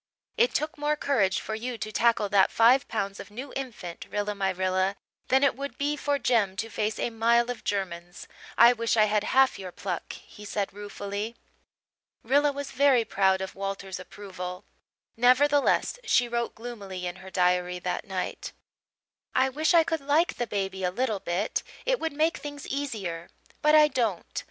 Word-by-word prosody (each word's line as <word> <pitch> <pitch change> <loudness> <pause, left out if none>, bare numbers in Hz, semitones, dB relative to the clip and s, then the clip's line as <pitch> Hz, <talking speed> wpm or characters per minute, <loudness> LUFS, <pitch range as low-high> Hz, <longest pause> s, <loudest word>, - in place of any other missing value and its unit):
"It 480 +1 +2
took 310 +1 -2
more 295 +1 +1
courage 230 -11 +1
for 220 - -5
you 235 +2 -4
to 215 -1 -5
tackle 230 -2 +2
that 195 -2 +4
five 250 +4 +4
pounds 200 -3 -3
of - - -9
new 255 +6 -8
infant, 225 -10 -6
Rilla 205 0 -2
my 195 -1 -1
Rilla, 185 +1 0 0.3
than 265 +2 +3
it 280 - +3
would 280 +1 -6
be 290 +1 0
for 290 -1 0
Jem 220 -8 +1
to 225 +3 -4
face 215 +1 -1
a 240 - -1
mile 235 +2 +2
of 245 - -8
Germans. 175 -3 -4 0.3
I 235 +2 +8
wish 230 -1 0
I 215 - +6
had 210 0 +1
half 265 -4 +3
your 185 -2 -7
pluck," 180 -1 -5
he 210 - -13
said 205 -1 -3
ruefully. 205 +2 -5 0.9
Rilla 285 +4 +3
was 280 0 -6
very 270 -3 +4
proud 190 -2 +2
of 190 - -5
Walter's 195 -1 -5
approval; 185 -1 -8 0.5
nevertheless, 280 - +3
she 450 - +3
wrote 235 0 -2
gloomily 200 -6 -7
in 175 +1 -4
her 190 0 -11
diary 180 -1 +1
that 180 0 -3
night: 190 -4 -4 0.8
"I 265 - +4
wish 300 +4 +1
I 330 - +7
could 325 -2 -2
like 295 +5 +2
the 240 - -2
baby 195 -2 -3
a 180 - +2
little 220 +1 -1
bit. 185 +4 -1 0.2
It - - +1
would 325 -2 -2
make 315 +3 +1
things 290 0 -7
easier. 205 -12 -4 0.3
But 300 +1 +5
I 305 -1 +8
don't. 230 - -2
225 Hz, 180 wpm, -27 LUFS, 195-275 Hz, 0.9 s, I